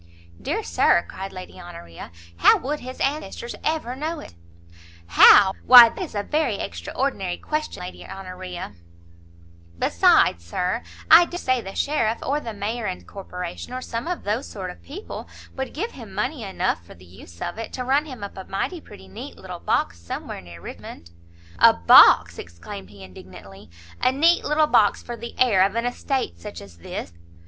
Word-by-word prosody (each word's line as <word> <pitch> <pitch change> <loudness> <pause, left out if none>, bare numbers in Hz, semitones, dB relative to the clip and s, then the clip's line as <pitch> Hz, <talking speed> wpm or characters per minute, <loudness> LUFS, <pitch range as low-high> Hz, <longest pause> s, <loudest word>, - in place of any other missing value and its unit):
"Dear - - -2
Sir," 85 - +2
cried 195 +1 -7
Lady 185 0 -10
Honoria, 85 - -10 0.3
"how 85 - +6
would 295 +3 -4
his 255 +1 -9
ancestors 270 -4 -3
ever 305 -6 -2
know 310 +4 -4
it?" - - -11 0.8
"How? 190 - +8
why 245 -2 +10
that - - -9
is 340 -11 -6
a 205 - -1
very 300 -4 0
extraordinary 180 - -3
question, 305 -11 -4
Lady 180 - -9
Honoria!" 185 - -8 1.0
"Besides, 85 0 +3
Sir, 180 - -2 0.3
I 335 +2 +9
dare 350 - -7
say 255 -7 0
the 195 -2 -9
sheriff, 230 -6 0
or 285 +2 0
the 235 -6 -6
mayor 215 +2 -4
and 185 - -6
corporation, 180 +2 -7
or 255 - -4
some 235 +6 -5
of 360 0 -3
those 215 +6 -2
sort 185 -3 -6
of - - -15
people, 390 +10 -9 0.3
would 265 0 -4
give 440 +10 -4
him 230 -6 -11
money 240 +7 -2
enough, 185 - -2
for 85 - -15
the 90 +2 -17
use 85 -1 -15
of 175 +5 -5
it, 225 - -6
to 255 - -4
run 275 +4 +1
him 255 -7 -9
up 200 - -7
a 190 - -6
mighty 325 - -3
pretty 95 - -14
neat 95 - -10
little - - -9
box 85 0 -1
somewhere 85 +2 -7
near 85 -1 -12
Richmond." 85 0 -10 0.5
"A - - +8
box!" 85 0 +6
exclaimed 85 +3 -9
he 100 -1 -13
indignantly; 95 +2 -13 0.3
"a 255 - +3
neat 330 +6 +3
little 305 +1 +3
box 210 -8 +3
for 240 - -6
the 235 0 -9
heir 230 -7 +4
of 200 +2 0
an 230 +1 -1
estate 245 - -2
such 85 0 -8
as 90 -4 -14
this!" 85 - -7
205 Hz, 180 wpm, -23 LUFS, -, 1.0 s, why